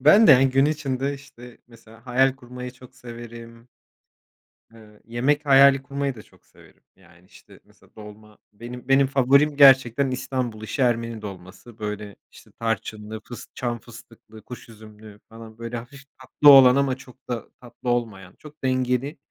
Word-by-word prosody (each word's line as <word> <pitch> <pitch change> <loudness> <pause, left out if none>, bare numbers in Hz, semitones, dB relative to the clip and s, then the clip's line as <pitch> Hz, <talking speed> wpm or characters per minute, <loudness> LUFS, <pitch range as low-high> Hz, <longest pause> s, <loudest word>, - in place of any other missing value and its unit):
Ben 195 - +6
de, - - +8
yani, 130 +1 +4
gün 135 +2 +3
içinde, 140 -2 -2
işte, 125 -4 -15
mesela 115 0 -19
hayal 130 +1 +2
kurmayı 125 -1 -9
çok 125 0 -18
severim. 115 0 -12 1.1
Eee, 105 -2 -18
yemek 135 +6 -1
hayali 135 -1 +5
kurmayı 140 -1 -4
da 110 - -12
çok - - -26
severim. - - -22
Yani, 85 +1 -23
işte, - - -19
mesela, - - -26
dolma, 105 0 -14 0.2
benim 120 +4 -10
benim 135 0 +3
favorim, 140 +2 +2
gerçekten 135 -1 +5
İstanbul 130 -3 -4
işi 120 +6 -4
Ermeni 115 -2 -1
dolması. 100 +3 -12
Böyle, 105 -1 -6 0.2
işte, - - -18
tarçınlı, 110 -1 -4
fıs 120 0 -10
çam 120 -2 -4
fıstıklı, 115 -1 -16
kuş 125 -1 -11
üzümlü 105 -1 -15
falan, 115 -1 -13
böyle, 115 +1 -6
hafif 140 +4 -12 0.2
tatlı 145 +3 +4
olan 130 -3 +8
ama 140 -2 +1
çok 130 0 -18
da 120 -2 -5
tatlı 125 0 -8
olmayan, 110 -7 -3
çok 150 -1 -16
dengeli, 130 +2 -1
120 Hz, 155 wpm, -23 LUFS, 115-135 Hz, 1.1 s, de